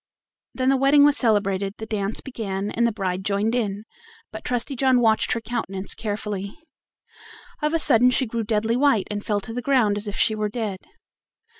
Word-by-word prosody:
Then 260 0 +1
the 270 - +3
wedding 275 +2 +5
was 290 0 +5
celebrated, 200 -5 +1
the 220 - -6
dance 210 -1 -3
began, 205 -6 -4
and 235 +1 +1
the - - 0
bride 190 -3 -3
joined 205 +3 0
in, 210 -4 -2 0.5
but 220 0 -8
Trusty 250 +3 -1
John 260 0 +3
watched 220 -2 +2
her 230 - -3
countenance 215 -4 -3
carefully. 205 -2 -4 1.0
Of 300 +2 0
a - - +4
sudden 250 -5 +5
she 260 +1 +1
grew 230 0 -3
deadly 220 +1 0
white, 260 -6 +2
and 205 0 -3
fell 205 -1 0
to 225 - -7
the 245 - -3
ground 240 -7 +2
as 205 +1 -2
if 205 - -4
she 220 - +2
were 215 -1 -2
dead. 210 -4 -4
220 Hz, 190 wpm, -23 LUFS, 205-245 Hz, 1.0 s, wedding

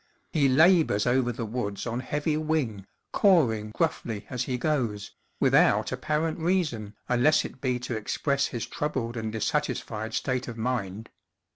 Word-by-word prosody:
He 140 -4 +3
labors 160 - +4
over 125 0 +2
the 115 0 -4
woods 105 -3 -3
on 120 0 -2
heavy 150 +3 -1
wing, 150 -11 -1 0.3
cawing 120 - +3
gruffly 115 -6 -2
as 125 -1 -2
he 125 - -2
goes, 120 -8 -1 0.3
without - - +4
apparent 155 +2 -1
reason 155 - -1
unless 125 +5 +3
it 130 - -9
be 125 -2 0
to 125 -1 -3
express 140 +6 0
his 120 -3 -4
troubled 130 -6 -3
and 110 -2 -3
dissatisfied 110 -3 -2
state 130 -1 -1
of 120 -2 -6
mind. 110 -3 -3
125 Hz, 145 wpm, -27 LUFS, 110-150 Hz, 0.3 s, labors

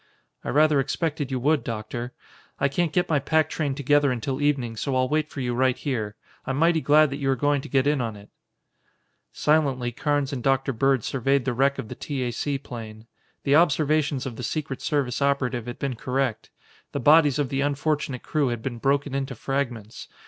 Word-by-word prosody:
"I - - -4
rather 150 +1 +4
expected 145 +1 -1
you 130 -1 -2
would, 150 +3 +2
Doctor. 115 +2 -5 0.5
I 140 - +2
can't 165 +3 0
get 180 +1 +1
my 150 -3 +2
pack 155 +2 +1
train 145 -4 -1
together 145 0 +3
until 130 +3 -3
evening, 135 -6 0
so 130 +4 -2
I'll 130 0 +2
wait 155 +2 0
for 140 - -6
you 125 -1 -1
right 130 +1 +2
here. 110 -8 -3 0.3
I'm 135 - -3
mighty 165 +1 +3
glad 150 0 +5
that 140 - -3
you 135 -2 -1
are 135 - +3
going 145 +2 +1
to - - -10
get 135 -1 +2
in 145 -2 +2
on 115 -3 -3
it." 100 0 -14 1.0
Silently 140 -5 +1
Carnes 145 +2 -1
and 130 - -3
Dr. 135 +1 +1
Bird 135 0 +2
surveyed 135 0 0
the 130 - 0
wreck 140 +3 +2
of - - -5
the - - -6
T. 140 -3 -4
A. 120 - -1
C. 140 +4 -2
plane. 110 -4 -9 0.4
The 140 0 +3
observations 150 -3 +2
of 120 -4 -6
the - - -6
secret 140 +1 -3
service 140 -3 -1
operative 130 -4 0
had 120 - -5
been 135 -2 -3
correct. 125 -2 -2 0.4
The 140 - -1
bodies 145 0 +5
of 145 -3 0
the 135 0 -1
unfortunate 145 -2 -1
crew 150 -3 0
had 120 -2 -3
been 120 -3 -4
broken 140 +2 +1
into 135 -1 -2
fragments. 120 -4 -4
135 Hz, 205 wpm, -25 LUFS, 125-145 Hz, 1.0 s, glad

